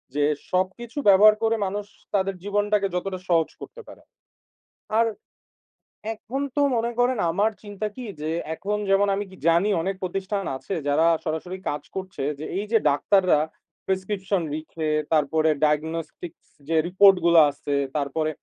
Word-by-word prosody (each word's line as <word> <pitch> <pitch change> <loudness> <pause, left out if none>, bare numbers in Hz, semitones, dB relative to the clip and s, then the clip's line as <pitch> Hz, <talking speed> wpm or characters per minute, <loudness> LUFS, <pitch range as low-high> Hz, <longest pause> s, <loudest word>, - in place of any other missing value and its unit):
যে, 145 - +2 0.3
সবকিছু 190 +8 -2
ব্যবহার 210 +2 +7
করে 225 0 +3
মানুষ 200 +2 -3 0.3
তাদের 195 0 0
জীবনটাকে 205 0 +1
যতটা 185 +1 -3
সহজ 165 -2 +3
করতে 480 -1 -10
পারে। - - -13 1.0
আর, 230 - +4 1.1
এখন 260 +6 -5
তো 290 - +2 0.2
মনে 235 +1 0
করেন, 250 0 +2
আমার 210 +5 +2
চিন্তা 205 +1 -4
কি? 255 -2 -7 0.2
যে, 155 - -2 0.3
এখন 210 +4 -2
যেমন 200 +1 +4
আমি 205 +1 -3
কি - - -12
জানি 170 +5 +4
অনেক 190 +2 -2
প্রতিষ্ঠান 195 +2 -2
আছে, 195 - -6
যারা 155 +4 +3 0.2
সরাসরি 165 +4 -3
কাজ 145 - -4
করছে 190 -7 -5 0.2
যে, 155 - -5
এই 205 - -2
যে 225 - +5
ডাক্তাররা 185 +2 +3 0.5
প্রেসক্রিপশন 190 0 -1
লিখে, 155 0 -4 0.2
তারপরে 155 +1 +2 0.2
ডায়াগনস্টিকস 160 +2 -3 0.2
যে 165 - +1
রিপোর্ট 195 +1 +6
গুলো 170 -1 +7
আসছে, 140 0 -4 0.2
তারপরে 150 +2 -1
190 Hz, 145 wpm, -24 LUFS, 160-205 Hz, 1.1 s, ব্যবহার